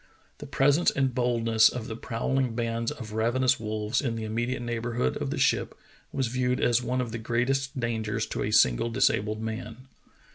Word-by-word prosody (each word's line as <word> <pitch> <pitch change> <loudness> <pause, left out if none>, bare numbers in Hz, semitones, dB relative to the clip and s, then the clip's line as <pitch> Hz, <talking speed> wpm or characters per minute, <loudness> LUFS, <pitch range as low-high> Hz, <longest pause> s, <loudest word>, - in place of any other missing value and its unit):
The - - -8
pres 140 +3 +3
ence 175 - +4
and 135 -2 0
boldness 115 -3 +3
of 125 -3 -5
the 110 - -5
prowling 120 +2 -1
bands 115 0 -1
of 110 -3 -7
ravenous 120 +4 +2
wolves 110 +2 -1
in 120 -6 -2
the 115 - -4
immediate 120 +3 -2
neighborhood 120 - -1
of - - -3
the - - -3
ship - - +1 0.3
was 135 - -1
viewed 125 +1 0
as 120 0 +3
one 125 +1 -1
of 120 -2 -4
the 115 - -4
greatest 130 +4 -1
dangers 110 -3 -1
to - - -3
a - - -1
single 65 - +3
dis 115 - +3
abled 110 +2 -3
man. 115 +3 -6
120 Hz, 190 wpm, -27 LUFS, 110-125 Hz, 0.3 s, ence